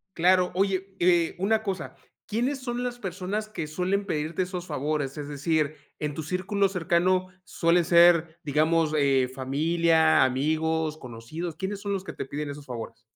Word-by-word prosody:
Claro. 180 +1 +3
Oye, 195 0 0
eh, 175 -2 +3
una 220 +4 +1
cosa, 190 -5 -4 0.3
¿quiénes 250 +6 -1
son 245 -1 -3
las 245 -1 -4
personas 195 +2 -3
que 175 -7 -5
suelen 185 +6 -1
pedirte 155 0 -2
esos 180 -1 -6
favores?, 145 -1 -2
es 145 -1 -5
decir, 150 +1 0 0.2
en 150 -1 -2
tu 160 - -5
círculo 190 +4 0
cercano 185 +1 +1 0.2
suelen 170 -1 +2
ser, 170 -1 +5
digamos, 155 +2 +2
eh, 135 -3 +3
familia, 160 +4 +3
amigos, 155 +4 0
conocidos, 150 +7 -7
¿quiénes 195 +3 -4
son 200 -1 -2
los 190 - -3
que - - -7
te - - -5
piden 145 +2 -5
esos 140 0 -8
favores? 115 -3 -7
170 Hz, 160 wpm, -26 LUFS, 150-185 Hz, 0.3 s, ser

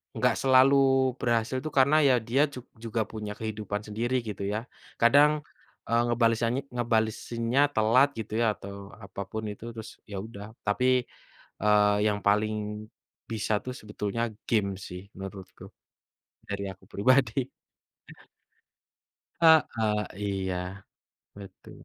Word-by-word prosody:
enggak 120 +1 +2
selalu 135 0 +5
berhasil 120 +2 0
itu 155 - -6
karena 140 +3 +5
ya 140 -4 +5
dia 135 +6 +2
jug 130 -4 -10 0.2
juga 115 0 -2
punya 105 -1 -7
kehidupan 105 -2 -4
sendiri 115 +4 -2
gitu 105 -2 -5
ya. 105 - 0 0.4
Kadang, 145 +5 +5 0.4
eee, 115 0 +3
ngebalesanya 115 +1 +1
ngebalesinnya 115 +2 0
telat 115 +6 +4
gitu 110 -1 -6
ya, - - +3
atau 100 0 -9 0.2
apapun 100 +3 -6
itu, 105 +2 -10
terus 110 -1 -7 0.2
ya 100 - -5
udah. 105 -2 -9 0.2
Tapi, 125 +4 +2 0.6
eee, 105 0 +4
yang 105 -1 0
paling 105 0 0 0.5
bisa 110 -1 -1
tuh 125 - -4
sebetulnya 105 +1 -4 0.3
game 105 -4 +2 0.2
sih 90 0 -7 0.2
menurutku. 95 -1 -9 0.8
Dari 100 0 -3
aku 95 - -20
pribadi. 130 +3 +2 1.9
Heeh. 120 -10 +4 0.2
Iya, 95 -2 -2 0.8
betu. 100 -1 -12
110 Hz, 120 wpm, -28 LUFS, 105-125 Hz, 1.9 s, selalu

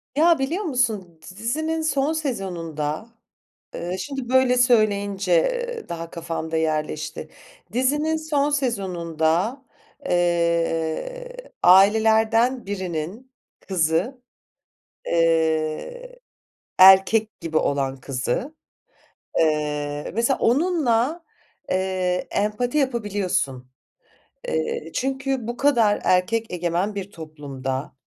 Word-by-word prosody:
Ya, 325 +1 +4
biliyor 320 +10 -1
musun 220 - -1
d 185 +4 -13
dizinin 315 +8 -2
son 285 0 +1
sezonunda, 180 - -3 0.7
eee, 180 +2 -4
şimdi 270 +4 -5
böyle 255 0 +4
söyleyince, 205 - +2
ııı, 460 - -9
daha 165 0 -6
kafamda 165 -1 -4
yerleşti. 155 -1 -2 0.4
Dizinin 295 +6 +1
son 300 -2 0
sezonunda, 190 - -1 0.4
eee, 170 - 0 0.3
ailelerden 220 +6 +4
birinin 190 +5 -5 0.4
kızı, 185 - 0 0.8
eee, 165 - 0 0.6
erkek 190 +3 +6
gibi 165 -2 -1
olan 135 -3 0
kızı, 130 - -3 0.9
eee, 150 -2 -1
mesela 235 +5 +1
onunla, 295 0 +1 0.5
eee, 185 -1 -1
empati 215 +7 -1
yapabiliyorsun. 195 - -1 0.8
Eee, 470 -1 -2
çünkü 265 -2 -2
bu 240 +1 -4
kadar 235 -7 +3
erkek 220 +5 +1
egemen 180 +3 -1
bir 200 0 -5
toplumda, 140 -5 -6
200 Hz, 90 wpm, -23 LUFS, 165-260 Hz, 0.9 s, erkek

